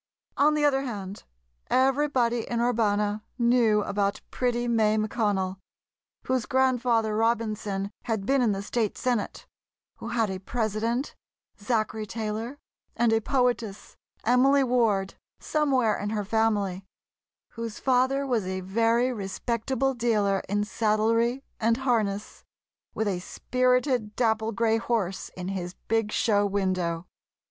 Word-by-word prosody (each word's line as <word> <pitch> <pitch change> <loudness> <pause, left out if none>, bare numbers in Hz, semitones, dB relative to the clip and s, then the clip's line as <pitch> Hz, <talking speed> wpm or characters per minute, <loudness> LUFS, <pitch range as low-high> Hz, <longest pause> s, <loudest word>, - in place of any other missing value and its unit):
On 300 +2 +4
the 300 -1 +2
other 270 -2 +3
hand, 205 -6 -6 0.4
everybody 260 -3 +2
in 235 - -1
Urbana 210 -3 +1
knew 235 -4 +3
about 200 0 -1
pretty 245 -1 0
May 220 -2 +2
McConnell, 205 -4 0 0.7
whose 255 -3 0
Grandfather 245 -4 +2
Robinson 215 -3 -1
had 220 -4 -2
been 270 +3 +2
in 235 -3 +3
the 195 0 -3
State 220 0 -1
Senate; 245 -5 -2 0.5
who - - -8
had 225 -3 0
a 190 - -4
President, 225 +5 -2 0.5
Zachary 215 0 -1
Taylor, 225 +4 -4 0.4
and 230 -1 +2
a 225 - +2
poetess, 240 -5 -1 0.3
Emily 270 +4 +4
Ward, 225 -6 +1 0.3
somewhere 265 -8 +1
in 205 - -3
her 210 -1 -2
family; 205 -3 0 0.7
whose 230 -1 -6
father 260 +2 +2
was 235 -8 0
a 185 0 -3
very 230 +6 +2
respectable 235 +5 -1
dealer 210 -5 +1
in 205 +1 +1
saddlery 230 +4 +1 0.2
and 230 +1 +2
harness, 220 -6 -1 0.5
with 220 - 0
a 190 -3 -1
spirited 250 +1 0
dapple 220 -2 +1
grey 225 0 +2
horse 215 -5 -2
in 180 0 -4
his 185 -2 -4
big 225 -1 +1
show 205 -3 +2
window. 185 -4 -1
225 Hz, 125 wpm, -27 LUFS, 205-245 Hz, 0.7 s, On